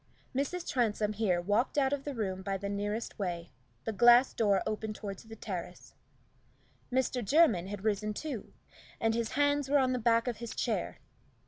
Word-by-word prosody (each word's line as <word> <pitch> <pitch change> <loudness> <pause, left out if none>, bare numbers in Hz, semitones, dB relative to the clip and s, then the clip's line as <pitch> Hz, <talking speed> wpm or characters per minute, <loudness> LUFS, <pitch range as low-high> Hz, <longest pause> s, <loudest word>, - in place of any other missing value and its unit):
Mrs. 330 +6 -2
Transome 215 -4 +1
here 200 -5 +1
walked 205 +10 0
out 270 -1 +3
of 275 -1 -3
the 290 -2 -4
room 190 -4 -2
by 195 0 -2
the 200 +1 -4
nearest 205 +3 -3
way 175 -3 -3 0.3
the 225 - -3
glass 240 +4 +6
door 200 -4 +2
open 215 0 -3
toward 200 -2 -6
the 225 0 -11
terrace. 190 -5 -7 1.0
Mr. 255 -1 0
Jermyn 220 - +4
had 205 0 -6
risen 215 0 0
too, 255 0 -5 0.5
and 225 0 +2
his 230 -1 -2
hands 285 0 +2
were 290 - +5
on 260 -2 +3
the 250 - -1
back 230 +1 +3
of 240 - -2
his 235 0 -6
chair. - - -1
225 Hz, 180 wpm, -31 LUFS, 200-255 Hz, 1.0 s, glass